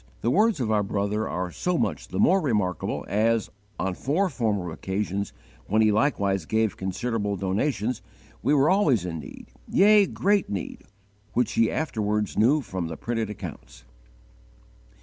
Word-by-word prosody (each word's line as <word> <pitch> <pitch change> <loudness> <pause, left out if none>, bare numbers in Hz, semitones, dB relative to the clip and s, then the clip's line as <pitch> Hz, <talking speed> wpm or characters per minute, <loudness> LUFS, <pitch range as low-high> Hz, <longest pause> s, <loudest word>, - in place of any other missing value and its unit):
The 120 - +1
words 215 - +3
of 115 -4 0
our 105 -1 +3
brother 105 +1 -1
are 90 0 -3
so 180 - -1
much - - -1
the - - -6
more 190 +2 +4
remarkable 105 - -1
as, 110 +2 +1 0.3
on 95 - -1
four 160 - 0
former 105 - -1
occasions, 100 +3 -3 0.4
when 110 +2 +3
he 110 - +4
likewise 100 - +1
gave 110 +3 +1
considerable 105 +2 -2
donations, 105 +5 -1 0.4
we 145 +5 +3
were 140 +1 +4
always 145 - +3
in 85 -2 -4
need, 70 - -11 0.2
yea, 205 0 +5
great 200 +1 +1
need, 100 -3 -5 0.5
which 125 - +1
he 115 -1 +3
afterwards 105 -8 -1
knew 135 +8 +4
from 95 -8 -4
the 80 -1 -6
printed 115 -2 -2
accounts." 105 - -9
110 Hz, 150 wpm, -26 LUFS, 100-135 Hz, 0.5 s, yea